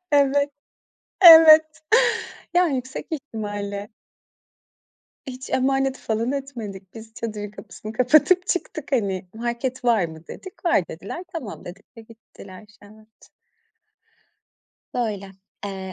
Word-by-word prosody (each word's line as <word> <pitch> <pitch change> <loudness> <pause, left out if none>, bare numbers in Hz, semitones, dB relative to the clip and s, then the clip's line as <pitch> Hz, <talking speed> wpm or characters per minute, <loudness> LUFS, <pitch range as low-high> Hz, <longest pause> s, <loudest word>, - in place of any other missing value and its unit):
Evet, 285 0 +3 0.7
evet. 320 -2 +10 0.9
Ya 355 0 +4
yüksek 260 -3 -4
ihtimalle 205 -8 -5 1.4
Hiç 255 0 -8
emanet 270 0 0
falan 230 +4 -2
etmedik. 220 -9 -7
Biz 225 0 -12
çadırın 210 -3 -6
kapısını 215 +1 -10
kapatıp 310 +9 +3
çıktık, 315 -5 -4
hani. 195 -6 -1
"Market 240 +2 -4
var 225 -6 +3
mı?" 160 0 -9
dedik, 375 -1 -11
"Var." 260 - +2
dediler. 200 - -8
"Tamam." 260 -11 -7
dedik 195 +6 -13
ve - - -10
gittiler. 215 -3 -15 0.2
Evet. 215 +1 -19 1.7
Böyle. 210 -5 -3 0.3
Eee, 190 -2 -6
230 Hz, 105 wpm, -23 LUFS, 205-275 Hz, 1.7 s, evet